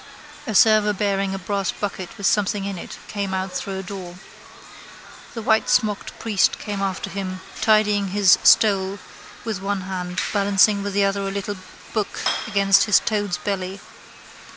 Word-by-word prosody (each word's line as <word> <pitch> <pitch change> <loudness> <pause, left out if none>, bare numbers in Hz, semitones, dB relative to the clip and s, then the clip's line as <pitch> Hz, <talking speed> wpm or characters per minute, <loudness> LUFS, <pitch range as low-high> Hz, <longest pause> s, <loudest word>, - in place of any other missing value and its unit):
A 220 - -3
server 215 0 +5
bearing 195 -1 -1
a - - -3
brass 195 +1 -2
bucket 195 -2 -6
with 200 - -5
something 205 -1 +1
in 195 -3 -4
it - - -9
came 200 -2 -3
out 190 0 -3
through 190 +1 -4
a 190 - -5
door. 185 -2 -8 1.2
The 225 - -5
whitesmocked 220 -1 +1
priest 215 -4 +1
came 205 -2 -5
after 190 -1 -2
him, 185 -1 -5 0.2
tidying 215 -2 +3
his 195 0 +4
stole 195 -2 +4 0.5
with 215 -5 -3
one 200 0 -2
hand, 185 -1 -4
balancing 200 0 +3
with 200 0 -4
the 200 0 +2
other 195 0 0
a 195 - -2
little 200 +1 -4 0.4
book 215 -3 -2 0.3
against 200 -2 +4
his 210 -3 +5
toad's 205 -4 -1
belly. 195 -1 -4
200 Hz, 155 wpm, -22 LUFS, 190-210 Hz, 1.2 s, server